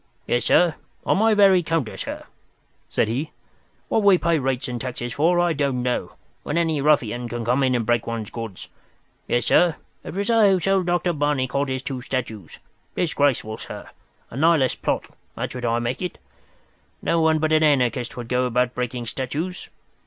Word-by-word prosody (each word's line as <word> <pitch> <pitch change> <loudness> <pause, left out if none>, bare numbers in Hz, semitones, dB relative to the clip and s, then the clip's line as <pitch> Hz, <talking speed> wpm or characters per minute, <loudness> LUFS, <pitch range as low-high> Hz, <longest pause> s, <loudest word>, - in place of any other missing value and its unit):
"Yes, 120 - 0
sir. 175 -2 +4 0.3
On - - +3
my 220 +2 +3
very 195 -3 +6
counter, 160 -8 -2
sir," - - -6 0.7
said - - +1
he. 135 +8 -2 0.6
"What 225 - +1
we 200 -2 +6
pay 170 -2 +1
rates 130 -1 -1
and 120 -2 -4
taxes 120 -2 -4
for 170 +6 +2
I 175 -1 +2
don't 140 -4 -1
know, 125 0 -2 0.3
when 150 - -3
any 160 -4 +1
ruffian 125 -5 +1
can 120 -1 -4
come 125 +4 +2
in 130 -1 +2
and 115 -2 0
break 120 -1 +1
one's 115 -2 -4
goods. 115 -5 -7 0.6
Yes, 120 - +1
sir, 175 -3 +4 0.3
it - - -8
was 200 +3 0
I 225 -3 +5
who 190 -1 +3
sold 190 0 +1
Dr. 175 0 +1
Barnicot 140 -2 0
his 130 0 -3
two 130 -3 -4
statues. 115 -8 -5 0.4
Disgraceful, 140 -9 0
sir! - - -9 0.4
A - - -9
Nihilist 155 -3 +2
plot—that's - - -4
what 125 -1 -5
I 115 0 +1
make 120 +2 -2
it. 180 - -4 0.9
No 170 0 +2
one 160 0 +3
but 155 0 0
an 155 - +4
anarchist 125 -5 +1
would 120 -2 -6
go 125 +1 +1
about 125 0 +1
breaking 125 -1 -3
statues. 150 +10 -4
135 Hz, 180 wpm, -23 LUFS, 120-165 Hz, 0.9 s, very